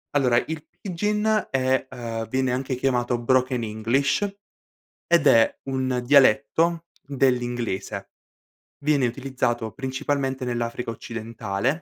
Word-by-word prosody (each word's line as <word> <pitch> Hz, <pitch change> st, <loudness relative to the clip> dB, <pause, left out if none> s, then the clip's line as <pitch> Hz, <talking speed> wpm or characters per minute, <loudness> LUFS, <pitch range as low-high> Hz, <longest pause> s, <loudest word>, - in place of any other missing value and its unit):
Allora, 125 Hz, -4 st, +4 dB
il 160 Hz, -1 st, -6 dB
pidgin 210 Hz, +3 st, 0 dB
è 130 Hz, 0 st, +1 dB
ehm, 115 Hz, -2 st, -5 dB
viene 130 Hz, 0 st, 0 dB
anche 130 Hz, +1 st, -1 dB
chiamato 125 Hz, -2 st, 0 dB
broken 125 Hz, 0 st, +1 dB
english, 125 Hz, -, 0 dB, 0.8 s
ed 170 Hz, -4 st, +3 dB
è 115 Hz, -3 st, +4 dB
un 130 Hz, -1 st, 0 dB
dialetto 145 Hz, +6 st, +4 dB, 0.2 s
dell'inglese. 125 Hz, -6 st, -1 dB, 0.7 s
Viene 140 Hz, -3 st, +3 dB
utilizzato 120 Hz, -3 st, -2 dB
principalmente 135 Hz, 0 st, -2 dB
nell'Africa 120 Hz, -1 st, -3 dB
occidentale. 115 Hz, -1 st, -4 dB
130 Hz, 100 wpm, -24 LUFS, 120-140 Hz, 0.8 s, Allora